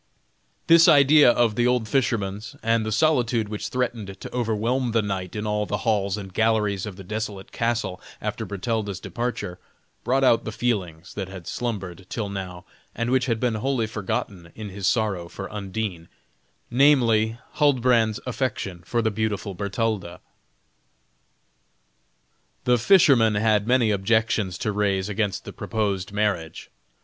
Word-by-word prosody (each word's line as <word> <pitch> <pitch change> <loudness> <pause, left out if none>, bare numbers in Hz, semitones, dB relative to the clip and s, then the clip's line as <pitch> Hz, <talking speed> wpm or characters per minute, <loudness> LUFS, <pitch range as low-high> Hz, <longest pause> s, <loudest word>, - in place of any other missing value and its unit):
This 165 0 +7
idea 145 -1 +7
of 120 -2 +3
the 120 +3 +2
old 125 -3 +1
fisherman's, 105 -4 -1
and 115 0 +2
the 110 - -3
solitude 120 -4 +2
which 105 -1 -4
threatened 115 -6 -3
to - - -9
overwhelm 120 +1 0
the 115 -2 +2
knight 95 -2 -4
in 105 0 -3
all 105 0 -1
the 105 - -3
halls 105 -3 +1
and 95 -2 -8
galleries 105 -2 +1
of 100 - -7
the 95 - -10
desolate 105 0 -5
castle, 115 -6 -2 0.2
after - - -3
Bertalda's 100 -1 -3
departure, 120 -7 -4 0.4
brought 130 +3 +1
out 120 -3 +4
the 110 - -4
feelings 95 -8 -2
that 100 -3 -4
had 95 -2 -9
slumbered 95 -7 -4
till 105 -3 -3
now 95 -3 -6 0.3
and 115 +1 -1
which 130 0 +2
had 115 -2 0
been 125 -1 +1
wholly 120 +2 0
forgotten 105 -5 -4
in 110 -2 -7
his 100 0 -3
sorrow 100 -7 0
for 95 - -7
Undine; 100 -4 -4 0.6
namely, 120 -5 +4 0.2
Huldbrand's 125 -6 +3
affection 115 -8 -3
for 115 +5 -1
the 110 - +1
beautiful 105 -2 -2
Bertalda. 100 -2 -2 2.4
The 125 -1 +3
fisherman 120 - +5
had 105 0 +2
many 120 -3 +3
objections 105 -2 +1
to 105 - -1
raise 100 -1 0
against 105 -1 -2
the - - -8
proposed 100 -4 -2
marriage. 100 -6 -2
110 Hz, 145 wpm, -24 LUFS, 100-120 Hz, 2.4 s, This